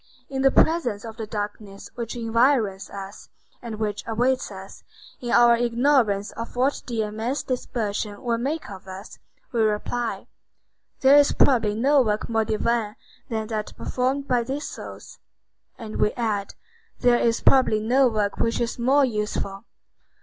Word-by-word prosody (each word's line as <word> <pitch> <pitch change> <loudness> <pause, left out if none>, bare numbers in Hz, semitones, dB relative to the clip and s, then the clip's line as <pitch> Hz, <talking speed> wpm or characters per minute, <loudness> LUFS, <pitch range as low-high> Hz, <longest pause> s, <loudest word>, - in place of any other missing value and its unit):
In 265 -1 -2
the 270 - +6
presence 255 -10 +2
of 225 -1 -8
the 220 - -5
darkness 205 -1 -6
which 235 -1 -5
environs 230 -3 +1
us, 195 0 -9 0.3
and 230 -2 -6
which 210 -1 -3
awaits 245 +3 0
us, 195 0 -10 0.4
in 240 - -5
our 240 0 +6
ignorance 235 -3 +2
of 230 +1 -7
what 260 +3 +1
the 230 -3 -1
immense 220 +6 -3
dispersion 215 -5 -3
will 235 -2 0
make 295 +6 -2
of 190 -1 -10
us, 190 +2 -9 0.3
we 235 - 0
reply: 220 +2 -1 0.8
"There 270 +1 +7
is 290 -1 +5
probably 225 -6 +3
no 275 +5 +4
work 215 -3 -1
more 225 -1 +1
divine 220 0 0 0.3
than 220 -1 -2
that 215 -2 -4
performed 265 +2 -1
by 245 -1 +2
these 270 +5 -4
souls." - - -10 0.6
And 220 -2 -7
we 210 - +2
add: 215 -4 -2 0.5
"There 245 -1 +4
is 230 0 +1
probably 255 -5 +4
no 250 +5 +3
work 210 -3 -1
which 230 - 0
is 235 0 -2
more 270 +4 +4
useful." 210 -3 -3
230 Hz, 155 wpm, -24 LUFS, 210-250 Hz, 0.8 s, There